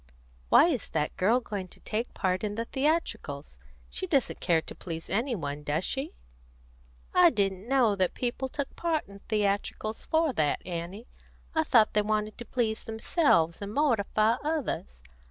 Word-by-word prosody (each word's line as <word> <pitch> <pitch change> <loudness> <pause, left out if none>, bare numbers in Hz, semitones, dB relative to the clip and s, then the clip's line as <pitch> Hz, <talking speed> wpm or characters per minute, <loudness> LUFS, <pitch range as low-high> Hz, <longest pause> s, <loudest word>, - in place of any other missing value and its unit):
"Why - - +8
is 295 - -1
that 150 -1 -1
girl 215 +7 +3
going 205 -6 -5
to - - -15
take 225 +3 -3
part 185 0 0
in 205 -1 -2
the 230 +1 -2
theatricals? 300 +7 -2 0.3
She 375 - -5
doesn't 280 -8 +1
care 165 -3 +2
to - - -9
please 165 -2 -7
any 235 +5 +1
one, 145 -5 -4
does 150 +4 -1
she?" 275 +3 -3 1.0
"I 360 -1 +7
didn't 195 - -1
know 250 -6 +4
that 185 -2 0
people 255 +2 -2
took 285 0 -4
part 330 -3 -1
in 200 0 -12
theatricals 210 +1 -1
for 320 -3 +2
that, 150 -7 0
Annie. 180 +5 -5 0.5
I 320 -1 +2
thought 235 -8 +4
they 210 - +4
wanted 215 +1 -1
to 240 - -6
please 225 -3 -1
themselves 220 - +2
and 200 +1 -5
mortify 225 -5 +2
others. 270 - -3
215 Hz, 165 wpm, -29 LUFS, 190-270 Hz, 1.0 s, Why